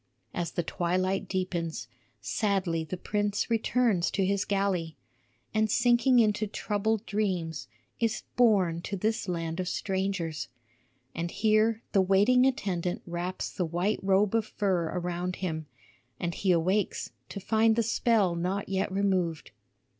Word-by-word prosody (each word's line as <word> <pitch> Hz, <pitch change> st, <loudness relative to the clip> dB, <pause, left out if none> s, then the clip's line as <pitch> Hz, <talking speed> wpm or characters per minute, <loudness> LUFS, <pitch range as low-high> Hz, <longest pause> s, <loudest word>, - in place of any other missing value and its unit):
As 175 Hz, -1 st, -3 dB
the 175 Hz, -, -1 dB
twilight 185 Hz, +3 st, -1 dB
deepens, 175 Hz, -3 st, -3 dB, 0.3 s
sadly 190 Hz, -6 st, 0 dB
the 170 Hz, +4 st, -5 dB
prince 205 Hz, +3 st, -1 dB
returns 225 Hz, -5 st, +2 dB
to 195 Hz, -, 0 dB
his 200 Hz, 0 st, 0 dB
galley, 190 Hz, -6 st, -1 dB, 0.6 s
and 215 Hz, 0 st, +2 dB
sinking 245 Hz, +3 st, +4 dB
into 215 Hz, -2 st, +3 dB
troubled 210 Hz, +1 st, -1 dB
dreams, 175 Hz, -10 st, -2 dB, 0.3 s
is 230 Hz, -1 st, 0 dB
borne 195 Hz, -9 st, +3 dB
to 200 Hz, +3 st, -4 dB
this 220 Hz, +2 st, -1 dB
land 165 Hz, -1 st, -3 dB
of 180 Hz, -, -2 dB
strangers. 190 Hz, -5 st, -2 dB, 0.7 s
And 170 Hz, +1 st, -3 dB
here 220 Hz, +3 st, +2 dB
the 195 Hz, -, +4 dB
waiting 205 Hz, +7 st, +4 dB
attendant 180 Hz, -8 st, -2 dB
wraps 175 Hz, +1 st, -4 dB
the 185 Hz, -, -2 dB
white 175 Hz, +5 st, 0 dB
robe 195 Hz, +1 st, +2 dB
of 225 Hz, -2 st, +1 dB
fur 190 Hz, -6 st, 0 dB
around 180 Hz, 0 st, -2 dB
him; 160 Hz, -4 st, -4 dB, 0.5 s
and 175 Hz, -1 st, -2 dB
he 190 Hz, +1 st, +1 dB
awakes 185 Hz, +4 st, +1 dB, 0.2 s
to 200 Hz, -, -6 dB
find 220 Hz, +2 st, +3 dB
the 230 Hz, -, +2 dB
spell 220 Hz, -4 st, +2 dB
not 185 Hz, +4 st, -2 dB
yet 190 Hz, 0 st, -1 dB
removed. 185 Hz, -5 st, 0 dB
195 Hz, 140 wpm, -28 LUFS, 175-215 Hz, 0.7 s, sinking